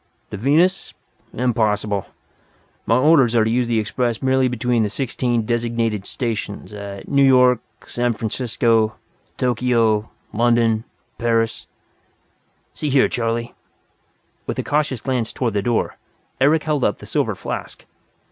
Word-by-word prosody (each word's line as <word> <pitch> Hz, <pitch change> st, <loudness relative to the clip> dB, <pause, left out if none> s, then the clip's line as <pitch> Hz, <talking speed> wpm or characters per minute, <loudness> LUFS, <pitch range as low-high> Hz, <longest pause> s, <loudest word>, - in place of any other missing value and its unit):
"To -, -, -4 dB
Venus? 160 Hz, -, +2 dB, 0.4 s
Impossible. 110 Hz, -5 st, 0 dB, 0.8 s
My 115 Hz, -, +4 dB
orders 135 Hz, -4 st, +4 dB
are 115 Hz, -, +5 dB
to 110 Hz, -, 0 dB
use 120 Hz, 0 st, +1 dB
the 115 Hz, -1 st, +1 dB
Express 110 Hz, +2 st, -1 dB
merely 130 Hz, -1 st, +2 dB
between 125 Hz, -1 st, 0 dB
the 105 Hz, -, +1 dB
sixteen 120 Hz, -1 st, -1 dB
designated 115 Hz, -3 st, -1 dB
stations, 110 Hz, -4 st, -4 dB
at 100 Hz, -1 st, -8 dB
New 140 Hz, 0 st, +2 dB
York, 125 Hz, -2 st, +5 dB, 0.3 s
San 120 Hz, 0 st, -1 dB
Francisco, 110 Hz, 0 st, 0 dB, 0.4 s
Tokyo, 115 Hz, -3 st, +1 dB, 0.2 s
London, 115 Hz, -1 st, +2 dB, 0.3 s
Paris 115 Hz, -1 st, 0 dB, 0.6 s
" -, -, -43 dB
"See 150 Hz, -, -3 dB
here, 135 Hz, -1 st, +4 dB
Charley," 115 Hz, 0 st, -2 dB, 0.9 s
with -, -, -3 dB
a -, -, -1 dB
cautious 145 Hz, -4 st, 0 dB
glance 125 Hz, -4 st, -1 dB
toward 120 Hz, -4 st, -2 dB
the 100 Hz, -, 0 dB
door, 115 Hz, +2 st, -1 dB, 0.4 s
Eric 150 Hz, +4 st, +3 dB
held 150 Hz, -4 st, 0 dB
up -, -, +1 dB
the -, -, -12 dB
silver -, -, -1 dB
flask. -, -, -6 dB
120 Hz, 135 wpm, -21 LUFS, 110-125 Hz, 0.9 s, are